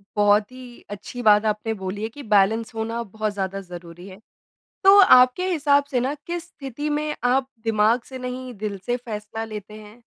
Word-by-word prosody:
बहुत 205 +1 +3
ही 255 -1 -12
अच्छी 205 +4 -7
बात 210 -1 +5
आपने 215 +1 -1
बोली 200 +3 -4
है 220 - -2
कि 285 +4 -11
बैलेंस 220 +3 +2
होना 225 +1 -3
बहुत 215 0 -4
ज़्यादा 195 0 -3
ज़रूरी 175 -1 -11
है। 190 0 -12 0.6
तो 390 +1 +8
आपके 255 0 +6
हिसाब 285 -3 +3
से 250 - +1
ना 265 +4 -1
किस 345 -1 -4
स्थिति 280 +2 -6
में 300 0 -2
आप 255 +1 +2 0.2
दिमाग़ 225 +2 +2
से 260 - -7
नहीं 250 0 -6
दिल 205 -1 -4
से 245 0 0
फ़ैसला 220 -2 -6
लेते 210 -1 -9
हैं? 215 +2 -13
225 Hz, 185 wpm, -23 LUFS, 210-255 Hz, 0.6 s, तो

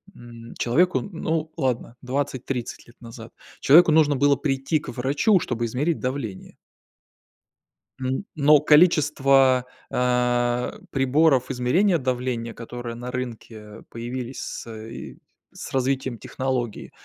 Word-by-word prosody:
м, 120 -1 -12
человеку, 175 +10 +2
ну, 160 -3 -3
ладно, 125 -4 -2
20-30 130 -2 -4
лет 120 - -18
назад 115 0 -11 0.3
человеку 165 +3 +6
нужно 150 -2 +4
было 140 +1 +3
прийти 135 +2 -1
к 145 - -10
врачу, 140 - +2
чтобы 120 -5 -3
измерить 145 +8 -1
давление. 125 -7 -5 1.4
М, 130 +9 -2
но 150 0 +5
количество, 140 -5 +4 0.2
э, 125 - 0
приборов 135 0 +2
измерения 165 +10 +2
давления, 125 -3 -3
которые 120 0 -7
на 120 +1 -7
рынке 115 -4 -7
появились 120 +2 -6
с, - - -7
э, 110 0 -9
и - - -9 0.4
с - - -9
развитием 130 -1 -1
технологии, 125 -3 -4
130 Hz, 115 wpm, -24 LUFS, 120-145 Hz, 1.4 s, человеку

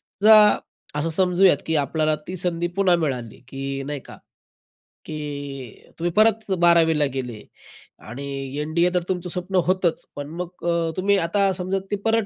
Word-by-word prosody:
समजा 215 +2 +5 0.6
असं 160 +2 -1
समजूयात 180 -2 +3
की 160 - +1
आपल्याला 155 +2 +1
ती 185 - -4
संधी 175 -1 -1
पुन्हा 185 -3 +4
मिळाली 125 -8 -3
की 135 0 -4
नाही 145 -1 -4
का? - - -13 0.9
की 145 -5 -7
तुम्ही 175 +1 -1
परत 220 +1 +3
12वी 170 -2 +4
ला 145 - +3
गेले 125 -5 -5 0.7
आणि 135 +3 -7 0.4
एन-डी-ए 170 +3 +1
तर 180 - +2
तुमचं 180 -1 -2
स्वप्न 180 +2 -3
होतंच. 185 -2 +1
पण 145 0 -6
मग 175 - -5 0.2
अ, 165 -1 0
तुम्ही 200 +2 +2
आता 195 +3 +1
समजा 185 +2 -2
ते - - +2
परत 225 -1 +2
170 Hz, 155 wpm, -23 LUFS, 145-185 Hz, 0.9 s, समजा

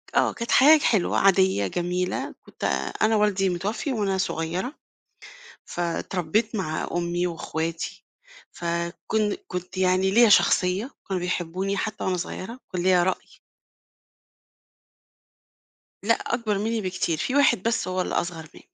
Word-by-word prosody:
آه - - +3
كانت 235 0 -5
حياه 300 +4 +7
حلوة 215 -10 +2
عادية 190 - +3
جميلة 180 - -2
كنت - - -13 0.4
أنا 220 +1 +4
والدي 205 -2 +2
متوّفي 205 - -2
وأنا 200 -4 0
صغيّرة، 180 - -2 0.9
فاتربّيت 175 +5 -1
مع 170 -6 -2
أمي 175 +1 -1
وأخواتي، 165 -1 -4 0.5
فكن 170 +5 -2
كنت 180 +1 -6
يعني 185 +1 +2
ليّا 235 +2 +6
شخصية 195 +4 +3
وكانوا 190 -2 -3
بيحبوني 180 +2 -2
حتّى 215 -1 -3
وأنا 185 -1 0
صغيّرة، 210 +7 -6
وكان 180 -2 -3
ليّا 180 -1 +4
رأي. 185 +1 -3 2.6
لأ 230 +3 +4
أكبر 230 -4 -2
مني 220 +2 -1
بكتير، 180 -3 -1
في 255 - -2
واحد 285 -9 +4
بس 230 -3 0
هو 185 0 -1
الأصغر 170 -3 -3
م - - -12
185 Hz, 125 wpm, -25 LUFS, 175-215 Hz, 2.6 s, حياه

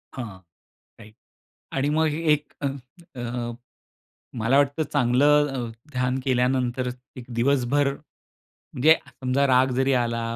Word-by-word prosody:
हां. 115 -7 -6 0.6
राईट 110 -1 -15 0.6
आणि 135 +2 0
मग 160 +2 +2
हे 155 +1 -2
एक 150 0 -3
अ, 140 - 0 0.5
अं, 120 -1 -4 0.8
मला 115 +5 +3
वाटतं 145 +2 +2
चांगलं 145 +3 +4
अ, 120 -2 -3 0.2
ध्यान 125 0 -1
केल्यानंतर 125 -1 +1 0.3
एक 125 - -8
दिवसभर 140 +3 +2 0.6
म्हणजे 155 +5 +2
समजा 135 +2 0
राग 130 0 +4
जरी 135 +1 +2
आला, 120 -2 0
130 Hz, 120 wpm, -24 LUFS, 120-140 Hz, 0.8 s, चांगलं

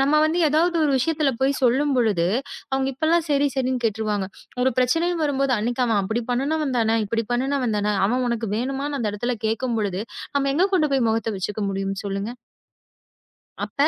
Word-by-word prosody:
நம்ம 285 +2 +2
வந்து 320 +3 +1
ஏதாவது 335 +4 +2
ஒரு 285 - +2
விஷயத்துல 300 +1 +1
போய் 275 +1 +3
சொல்லும்பொழுது, 245 -8 +2 0.5
அவங்க 265 0 +1
இப்ப 280 +5 -3
எல்லாம் 335 0 +3
சரி 285 0 +3
சரின்னு 255 -1 0
கேட்டுருவாங்க. 210 -3 -1 0.4
ஒரு 260 - +4
பிரச்சனை 325 +8 +2 0.2
வரும்போது 275 -2 +1
அன்னைக்கு 240 +3 0
அவ 220 -3 +2
அப்படி 220 +5 -1
பண்ணுனவன் 275 +1 0
தானே, 225 0 +2
இப்படி 230 +2 -1
பண்ணுனவன்தான 240 -5 0
அவன் 250 +3 0
உனக்கு 230 -2 -2
வேணுமான்னு 275 +3 -2
அந்த 215 -3 0
இடத்துல 240 +4 -1
கேக்கும்பொழுது 220 -4 -1 0.3
நாம 275 -1 +1
எங்க 355 +6 +4
கொண்டு 305 -5 +2
போய் 260 -4 +2
முகத்த 225 0 -1
வச்சுக்க 205 +3 -3
முடியும் 195 0 -3
சொல்லுங்க. 200 +3 -3 1.3
அப்ப 285 +1 +1
250 Hz, 165 wpm, -23 LUFS, 220-280 Hz, 1.3 s, ஒரு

